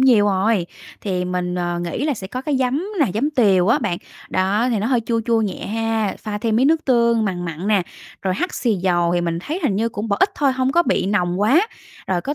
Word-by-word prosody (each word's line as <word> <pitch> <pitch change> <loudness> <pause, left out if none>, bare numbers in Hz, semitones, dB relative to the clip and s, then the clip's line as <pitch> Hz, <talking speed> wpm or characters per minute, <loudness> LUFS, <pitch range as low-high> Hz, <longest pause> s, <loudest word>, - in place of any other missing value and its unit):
nhiều 245 -6 +5
rồi, 195 -1 +1 0.3
thì 185 -3 -2
mình, 180 0 -2
ờ, 175 -1 -2
nghĩ 175 - -3
là 295 -3 +1
sẽ 190 -3 -7
có 250 +6 -5
cái 290 -2 0
giấm 260 +5 0 0.2
nà, 285 - +5
giấm 280 +8 0
tiều 200 -9 +3
á 235 - +4
bạn, 190 -7 -2 0.3
đó 200 +6 +1
thì 225 - +1
nó 210 - -1
hơi 250 -2 +2
chua 230 -1 +1
chua 230 -2 +3
nhẹ 205 -4 -3
ha, 225 -1 -1
pha 210 -1 -5
thêm 225 0 0
miếng 260 +3 +4
nước 320 +1 +2
tương, 235 -3 +3
mằn 180 -3 -2
mặn 170 +3 -5
nè, 205 -3 +3 0.4
rồi 185 -1 0
hắc 360 - -2
xì 235 -5 +1
dầu 175 -2 +1
thì 175 - +1
mình 170 -1 -1
thấy 320 - -4
hình 210 -10 +1
như 225 +3 +1
cũng 215 0 -5
bỏ 200 - +1
ít 395 - +4
thôi, 280 -3 +2
hông 260 +1 0
có 345 - +4
bị 260 - 0
nồng 180 -3 0
quá, 280 - +4 0.4
rồi 180 -2 0
có 285 - -3
215 Hz, 255 wpm, -20 LUFS, 185-255 Hz, 0.4 s, nhiều